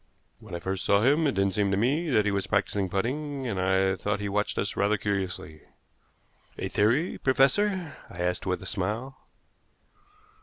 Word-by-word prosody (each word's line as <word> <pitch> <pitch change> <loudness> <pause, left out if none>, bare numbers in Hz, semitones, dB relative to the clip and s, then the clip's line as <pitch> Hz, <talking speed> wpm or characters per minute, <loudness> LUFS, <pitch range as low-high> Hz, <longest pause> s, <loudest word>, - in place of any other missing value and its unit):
When 105 -6 -8
I - - -3
first 95 +2 -3
saw 100 +1 +3
him 145 +5 +4
it 140 - +1
didn't 100 -1 +1
seem 100 0 +1
to 95 - +1
me 145 - +1
that 105 -6 +3
he 105 - +2
was 100 -1 -1
practicing 100 -1 0
putting, 135 +8 -2
and 100 -6 -2
I 95 0 +2
thought 105 +1 -2
he 105 0 -3
watched 105 +1 -1
us 100 - -1
rather 100 +1 +2
curiously." 95 -6 -3 1.0
"A - - -3
theory, 120 - +1
professor?" 165 +7 +2
I 85 - -11
asked 90 +2 -1
with 90 -1 -1
a - - -9
smile. 110 +7 -3
105 Hz, 180 wpm, -27 LUFS, 95-130 Hz, 1.0 s, him